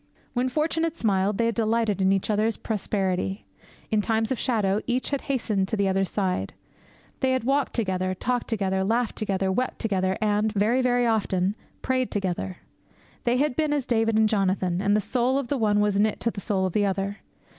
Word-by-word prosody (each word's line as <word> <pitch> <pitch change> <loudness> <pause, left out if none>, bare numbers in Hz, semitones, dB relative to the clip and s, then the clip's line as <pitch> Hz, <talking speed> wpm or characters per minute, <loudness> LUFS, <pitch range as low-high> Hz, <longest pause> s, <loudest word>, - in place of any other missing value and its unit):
When 250 +1 0
fortune 315 +4 0
had 330 0 -1
smiled, 200 -3 +1
they 230 - +2
had 230 - +1
delighted 225 -3 +1
in 190 0 +4
each 195 +2 +1
other's 215 +1 +1
prosperity. 195 -2 -2 0.5
In 215 -1 +3
times 225 +1 0
of 260 - -1
shadow, 210 -5 +1
each 250 +3 -1
had 280 - -1
hastened 215 -7 0
to 220 - -1
the 200 -1 +2
other's 195 0 +1
side. 190 -3 -1 0.7
They 260 -1 +2
had 260 - 0
walked 275 +2 +1
together, 185 -4 -1
talked 245 +5 -1
together, 190 -4 0
laughed 230 +4 0
together, 195 -3 -1
wept 250 +6 -1
together, 190 -4 0
and 215 0 +1
very, 220 +5 +2
very 245 -1 +2
often 200 -4 +1 0.3
prayed 255 -1 0
together. 190 -2 -2 0.7
They 240 +1 +2
had 280 -1 +1
been 305 -2 +1
as 285 -4 -1
David 225 -2 +1
and 220 0 +5
Jonathan, 190 -3 0
and 205 +1 +3
the - - +1
soul 250 +4 +1
of 275 -4 -3
the 285 - 0
one 210 -2 +2
was 205 -1 +2
knit 215 0 +1
to 230 - +1
the 200 - -7
soul 190 -1 0
of 185 - -2
the 205 -1 +2
other. 195 +1 -2
215 Hz, 200 wpm, -25 LUFS, 195-245 Hz, 0.7 s, and